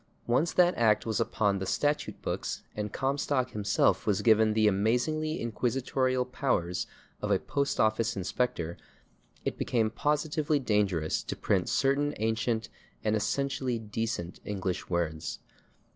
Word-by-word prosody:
Once 135 Hz, +8 st, +2 dB
that 180 Hz, 0 st, +4 dB
act 110 Hz, -2 st, +3 dB
was 110 Hz, -2 st, -1 dB
upon 100 Hz, -3 st, +1 dB
the 95 Hz, -, -3 dB
statute 145 Hz, +7 st, -1 dB
books -, -, -3 dB
and 105 Hz, -1 st, -3 dB
Comstock 135 Hz, -1 st, 0 dB
himself 105 Hz, -1 st, +1 dB
was 100 Hz, -3 st, +2 dB
given 110 Hz, -1 st, +5 dB
the 110 Hz, -1 st, +4 dB
amazingly 125 Hz, +10 st, +1 dB
inquisitorial 130 Hz, +2 st, 0 dB
powers 125 Hz, -9 st, -1 dB, 0.3 s
of 105 Hz, -, -2 dB
a 100 Hz, -, +4 dB
post 140 Hz, +8 st, -1 dB
office 110 Hz, +1 st, +2 dB
inspector, 90 Hz, -3 st, -2 dB, 0.7 s
it -, -, -2 dB
became 110 Hz, -3 st, +1 dB
positively 150 Hz, +3 st, +1 dB
dangerous 100 Hz, -, +1 dB
to -, -, -5 dB
print -, -, 0 dB
certain 140 Hz, +2 st, +2 dB
ancient 110 Hz, +1 st, 0 dB, 0.4 s
and 110 Hz, 0 st, +2 dB
essentially 130 Hz, +2 st, 0 dB
decent 110 Hz, -5 st, -4 dB
English 95 Hz, -3 st, -3 dB
words. 80 Hz, -3 st, -2 dB
115 Hz, 130 wpm, -29 LUFS, 105-135 Hz, 0.7 s, given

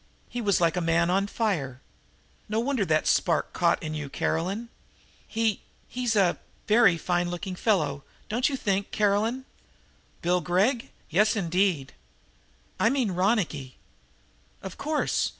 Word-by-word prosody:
He 245 Hz, -, -4 dB
was 200 Hz, -4 st, +2 dB
like 165 Hz, -2 st, +2 dB
a 180 Hz, -, 0 dB
man 170 Hz, +1 st, +2 dB
on 195 Hz, +2 st, +1 dB
fire. 165 Hz, -, -2 dB, 0.7 s
No 215 Hz, +1 st, 0 dB
wonder 245 Hz, -3 st, 0 dB
that 155 Hz, -3 st, +2 dB
a -, -, -19 dB
spark 170 Hz, -4 st, +1 dB
caught 170 Hz, -1 st, +1 dB
in 155 Hz, -1 st, -4 dB
you, 150 Hz, -2 st, -5 dB
Caroline. 195 Hz, +12 st, -2 dB, 0.6 s
He 225 Hz, -2 st, 0 dB, 0.3 s
he's 245 Hz, -3 st, -1 dB
a 190 Hz, -4 st, +3 dB, 0.3 s
very 215 Hz, -5 st, +5 dB
fine 175 Hz, +1 st, 0 dB
looking 175 Hz, +2 st, -5 dB
fellow, 180 Hz, -9 st, 0 dB, 0.2 s
don't 240 Hz, +6 st, +1 dB
you 280 Hz, -, -2 dB
think, 200 Hz, -3 st, -1 dB
Caroline?" 215 Hz, +5 st, +1 dB, 0.8 s
"Bill 180 Hz, +1 st, +2 dB
Gregg? 195 Hz, -, +1 dB, 0.2 s
Yes, 210 Hz, +7 st, +3 dB
indeed." 180 Hz, -6 st, 0 dB, 0.9 s
"I 225 Hz, -, +4 dB
mean 255 Hz, -6 st, 0 dB
Ronicky." 180 Hz, -, 0 dB, 0.9 s
"Of 190 Hz, -2 st, -7 dB
course! 305 Hz, +1 st, 0 dB
195 Hz, 140 wpm, -27 LUFS, 170-225 Hz, 0.9 s, very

